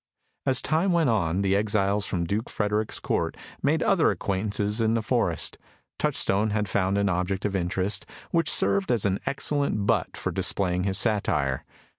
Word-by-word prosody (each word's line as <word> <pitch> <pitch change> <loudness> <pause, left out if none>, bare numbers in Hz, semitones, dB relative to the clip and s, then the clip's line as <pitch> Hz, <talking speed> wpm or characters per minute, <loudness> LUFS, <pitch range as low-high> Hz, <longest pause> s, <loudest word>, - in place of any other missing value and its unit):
As 130 -2 +2
time 160 +6 +1
went 165 -7 +3
on, 95 -3 +1
the 95 0 +2
exiles 100 -1 +1
from 85 -2 -1
Duke 105 +6 -2
Frederick's 105 0 -1
court - - -1 0.2
made - - +2
other - - +3
acquaintances 105 +2 0
in 110 0 +2
the 115 - 0
forest. 105 - 0 0.4
Touchstone 100 +3 +1
had 105 0 -1
found 95 +1 +1
an 100 0 +2
object 95 +1 -1
of 100 -1 -1
interest, 95 +2 -1 0.2
which 165 -1 +2
served 100 +2 +2
as 115 -4 +1
an 95 -1 +1
excellent 140 -7 -1
butt - - 0
for - - -2
displaying 90 -1 0
his 95 -1 0
satire. 95 - +1
100 Hz, 165 wpm, -26 LUFS, 95-110 Hz, 0.4 s, went